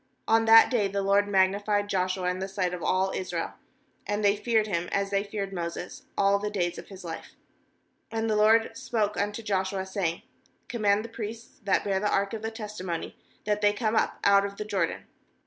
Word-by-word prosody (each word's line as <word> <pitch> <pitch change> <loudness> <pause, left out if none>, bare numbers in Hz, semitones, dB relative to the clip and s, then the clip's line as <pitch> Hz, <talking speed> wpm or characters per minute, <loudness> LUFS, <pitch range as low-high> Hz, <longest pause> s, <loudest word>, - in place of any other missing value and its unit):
140n 225 0 +4
that 225 +2 +8
day 220 -5 +2
the 200 0 -2
LORD 200 +1 +3
magnified 205 +1 +2
Joshua 185 -1 -1
in 180 0 -1
the 190 - -3
sight 185 -2 -1
of 180 - -5
all 190 +2 +1
Israel; 175 -3 -3 0.5
and 205 0 0
they 200 0 +5
feared 220 0 +1
him, 175 -4 -2
as 200 0 0
they 200 0 +1
feared 200 -1 -5
Moses, 170 0 -5
all 200 0 +3
the 210 +1 -2
days 175 -4 -1
of - - -11
his 195 -2 -11
life. 165 -1 -7 0.8
15And 225 0 -1
the 215 - +1
LORD 225 +2 +4
spoke 215 -3 -1
unto 205 +2 -2
Joshua, 190 -2 -1
saying: 190 -3 -2 0.4
16' - - -42
Command 210 -2 +1
the - - -8
priests 225 0 -7
that 200 - +2
)ear 195 -1 +1
the 210 +1 0
ark 200 +1 +1
of 220 - -4
the 220 - -2
testimony, 210 -6 -5 0.3
that 210 0 0
ihey 205 0 +3
come 220 -1 0
up - - +1
out 200 0 +5
of 200 0 -5
the 210 - -4
Jordan.' 205 -2 -1
200 Hz, 205 wpm, -27 LUFS, 190-215 Hz, 0.8 s, that